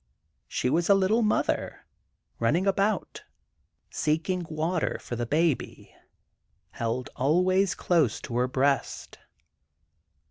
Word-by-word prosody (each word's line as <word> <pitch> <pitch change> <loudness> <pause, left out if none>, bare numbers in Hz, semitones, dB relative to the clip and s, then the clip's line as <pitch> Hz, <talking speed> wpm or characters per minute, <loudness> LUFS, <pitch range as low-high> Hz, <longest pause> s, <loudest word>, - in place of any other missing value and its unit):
She - - -2
was 165 +7 +1
a 200 - +7
little 195 +4 +2
mother, 215 -1 -1 0.5
running 155 +11 +1
about, 200 +2 0 0.7
seeking 165 +3 -1
water 160 +2 -1
for 120 - -6
the 120 0 -3
baby 155 +1 -1 0.8
held 115 +2 -3
always 180 +7 +2
close 160 - +1
to 120 - -6
her 125 +1 +2
breast. 135 +2 -1
160 Hz, 105 wpm, -27 LUFS, 130-185 Hz, 0.8 s, a